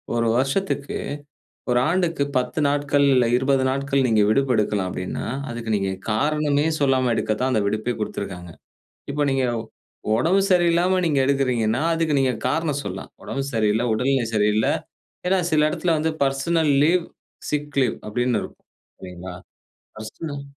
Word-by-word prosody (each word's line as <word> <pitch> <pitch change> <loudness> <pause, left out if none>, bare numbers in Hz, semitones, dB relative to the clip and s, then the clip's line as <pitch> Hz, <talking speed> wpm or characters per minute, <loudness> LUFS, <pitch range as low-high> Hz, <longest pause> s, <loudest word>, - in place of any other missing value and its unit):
1 115 0 +1
வருஷத்துக்கு, 140 +2 -1 0.7
1 125 0 +3
ஆண்டுக்கு 170 -4 +1
10 125 +3 -1
நாட்கள் 145 0 +1
இல்ல 125 -2 +4
20 130 0 +2
நாட்கள் 135 0 0
நீங்க 110 -3 +3
விடுப்பு 135 +2 +2
எடுக்கலாம் 105 -3 0
அப்படின்னா, 90 0 -4 0.2
அதுக்கு 115 -1 -4
நீங்க 95 -1 -1 0.2
காரணமே 150 +4 +1
சொல்லாம 130 -3 +2
எடுக்க 110 - 0
தான் 130 - +1
அந்த 110 - +2
விடுப்பே 110 +4 -1
குடுத்திருக்காங்க. 90 -4 -5 0.6
இப்போ 145 +1 0
நீங்க 135 -1 +1 0.7
உடம்பு 180 +10 +3
சரியில்லாம 175 +1 +3
நீங்க 145 -3 +1
எடுக்கிறீங்கன்னா, 125 -3 +1
அதுக்கு 160 -3 +1
நீங்க 130 -2 +2
காரணம் 150 0 -1
சொல்லாம். 95 0 -6
உடம்பு 135 0 -3
சரியில்ல, 110 +1 +1
உடல்நிலை 125 +1 +1
சரியில்ல. 105 +1 +2 0.6
ஏன்னா, 190 - +3
சில 155 -1 +4
இடத்துல 170 0 0
வந்து 160 +1 0
பெர்சனல் 145 +3 +1
லீவ், 170 +2 +2 0.4
சிக் 150 -1 -2
லீவ் 125 - 0
அப்படின்னு 120 +2 0
இருக்கும். - - -11 0.4
சரிங்களா. 90 0 -8 0.6
பெர்சனல் 140 +6 -7
135 Hz, 140 wpm, -23 LUFS, 110-150 Hz, 0.7 s, இல்ல